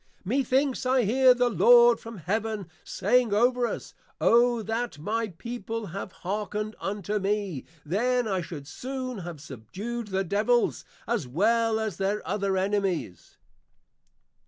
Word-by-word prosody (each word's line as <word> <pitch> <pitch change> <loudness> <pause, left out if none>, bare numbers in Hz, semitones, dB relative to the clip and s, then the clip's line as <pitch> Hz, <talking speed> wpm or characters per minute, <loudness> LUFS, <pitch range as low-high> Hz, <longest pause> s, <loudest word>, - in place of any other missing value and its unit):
Methinks 265 +4 +1
I 255 0 +3
hear 250 +4 +5
the 245 -1 +2
Lord 240 0 +6
from 230 -1 -9
Heaven 205 +3 -2 0.2
saying 230 +1 +1
over 245 +2 +3
us, - - -6 0.3
_O 235 -1 +4
that 225 -4 -2
my 220 +9 -2
People 225 +3 -6
had 195 +1 -6
hearkened 210 +3 -4
unto 205 +1 -2
me; 195 -7 -2 0.2
then 240 +8 +1
I 190 -3 0
should 155 -4 -8
soon 255 - -5
have 170 -3 -7
subdued 190 - -6
the 190 -1 -1
Devils, 215 +6 +1 0.2
as 225 - -1
well 220 - +2
as 220 -5 -3
their 200 0 -1
other 195 0 0
Enemies! 190 - -2
215 Hz, 135 wpm, -27 LUFS, 195-240 Hz, 0.3 s, Lord